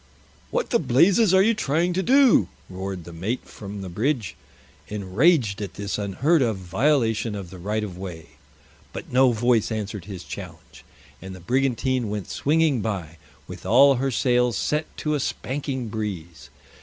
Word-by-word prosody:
"What - - -2
the 235 - +3
blazes 175 - +4
are 190 0 +5
you 225 +3 +3
trying 175 -3 0
to 190 - 0
do?" 265 +4 +5 0.2
roared 95 -1 -5
the 85 - -11
mate 100 +10 -3
from 100 -1 -8
the - - -6
bridge, 110 - -1 0.5
enraged 105 - +1
at 100 -3 -6
this 100 0 -3
unheard 135 - +1
of 115 -5 +1
violation 115 - 0
of 95 -4 -7
the 95 - -10
right 105 +4 -2
of 90 -4 -7
way. 90 -4 -8 0.6
But - - -8
no 130 0 +5
voice 115 -1 +1
answered 105 -3 -4
his 95 -4 -8
challenge, - - -10 0.4
and 95 0 -8
the - - -11
brigantine 130 +2 0
went 105 -3 -5
swinging 150 -4 +2
by, 90 -7 -4 0.3
with - - -9
all 135 +4 +6
her 135 +2 0
sails 125 -3 +1
set 150 +1 -1
to 150 - -1
a 150 - 0
spanking 130 -1 -3
breeze. 95 -7 -6
115 Hz, 165 wpm, -24 LUFS, 100-140 Hz, 0.6 s, all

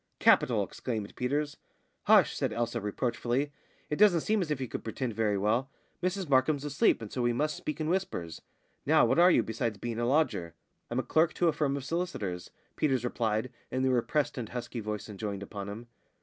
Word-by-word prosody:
"Capital!" - - +4
exclaimed 110 -5 -5
Peters. 145 +4 -1 0.5
"Hush!" - - +5
said - - -1
Elsa, 115 0 -2
reproachfully. 120 +6 -1 0.4
"It 150 - 0
doesn't 195 -6 +5
seem 215 +3 +1
as 170 - -2
if 150 -3 -1
you 130 - -3
could - - -6
pretend 115 +1 -3
very 105 -2 +1
well. 115 +7 +1 0.3
Mrs 185 0 -1
Markham's 140 +2 +2
asleep, 140 -5 +2
and 105 - -8
so 125 - -2
we 120 0 +2
must 150 +5 0
speak 150 - -5
in 155 - -1
whispers. 160 - -2 0.4
Now, - - +5
what - - +2
are 175 +1 +8
you, 120 - +4
besides 115 -1 -2
being 115 +2 -4
a 120 - 0
lodger?" 120 - +1 0.3
"I'm 120 - -3
a 130 - +1
clerk 160 +2 +2
to 175 - +3
a - - +1
firm 140 -2 0
of 135 - -6
solicitors," 130 - -3 0.3
Peters 135 -5 +1
replied, 115 0 -1 0.2
in 130 0 -1
the 130 - +3
repressed 145 +3 0
and 115 -3 -5
husky 125 0 -5
voice 105 -1 -4
enjoined 100 -1 -5
upon 100 0 -6
him. 110 +4 -7
125 Hz, 200 wpm, -30 LUFS, 110-150 Hz, 0.5 s, are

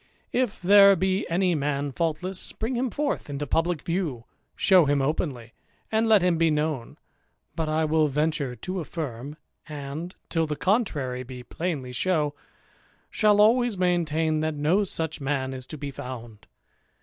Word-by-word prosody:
If 245 -4 0
there 200 +1 +7
be 190 +2 0
any 180 +1 +2
man 145 -2 -1
faultless, 170 +6 -3
bring 225 +4 -3
him 250 +1 0
forth 285 - -2
into 145 +1 -3
pubh'c 165 +3 0
view, 165 -9 -2 0.3
show 185 -4 +5
him 145 0 +2
openly, 135 -5 -2 0.4
and 225 +1 +2
let 210 -4 +6
him 175 -2 +2
be 165 -1 +4
known; 150 -5 -2 0.6
but 160 -1 -2
I 155 +1 +1
will 155 0 +3
venture 150 -2 -1
to 180 +11 -6
afSrm, 145 -4 -5 0.3
and, 150 +4 -6
till 165 -2 0
the 150 - -2
contrary 145 - 0
be 125 0 -9
plainly 140 -3 -4
shown, 155 0 +1 0.8
shall 210 -2 +3
always 235 0 +4
maintain, 165 -3 +1
that 155 0 -1
no 160 +8 +2
such 160 -4 -4
man 135 -1 -1
is 130 -1 -8
to 155 - -7
be 140 0 -5
found. 120 -6 -9
155 Hz, 155 wpm, -26 LUFS, 140-185 Hz, 0.8 s, there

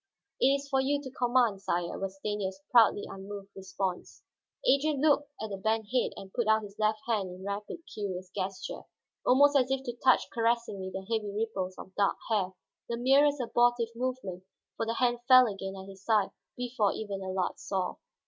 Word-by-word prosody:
"It - - +5
is 280 +1 +1
for 270 -2 +2
you 285 +2 +1
to 270 -2 -8
command, 245 -5 +2
sire," 175 -2 -2
was 195 0 -4
Stanief's 195 -1 -3
proudly 225 -4 +6
unmoved 195 +1 -8
response. 190 -1 -4 0.4
Adrian 280 +1 +3
looked 290 -1 +3
down - - -3
at 205 -2 -4
the 190 - -11
bent 220 0 0
head 250 - +2
and 190 -1 -10
put 240 -3 0
out 220 0 +4
his 200 -1 -10
left 215 0 +2
hand 210 -5 0
in 185 +1 -9
rapid, 205 +11 -4
curious 185 -3 -5
gesture, 190 0 -4 0.5
almost 285 +3 +6
as 260 -2 +4
if 270 0 0
to 240 -2 -5
touch 255 -2 +5
caressingly 230 -5 0
the 190 0 -6
heavy 220 -2 -1
ripples 200 -3 -3
of 190 - -10
dark 200 0 +2
hair, 190 -4 +1 0.4
the 235 - -1
merest 280 +4 +4
abortive 240 -1 +2
movement, 235 -8 -3 0.3
for 225 - -2
the 230 - -1
hand 240 0 +2
fell 255 -1 +9
again 195 -3 -4
at 190 0 -9
his 195 0 -12
side 215 -2 +2 0.3
before 245 -4 +1
even 200 -3 -5
Allard 185 -1 -2
saw. 185 -2 -2
215 Hz, 185 wpm, -30 LUFS, 195-250 Hz, 0.5 s, fell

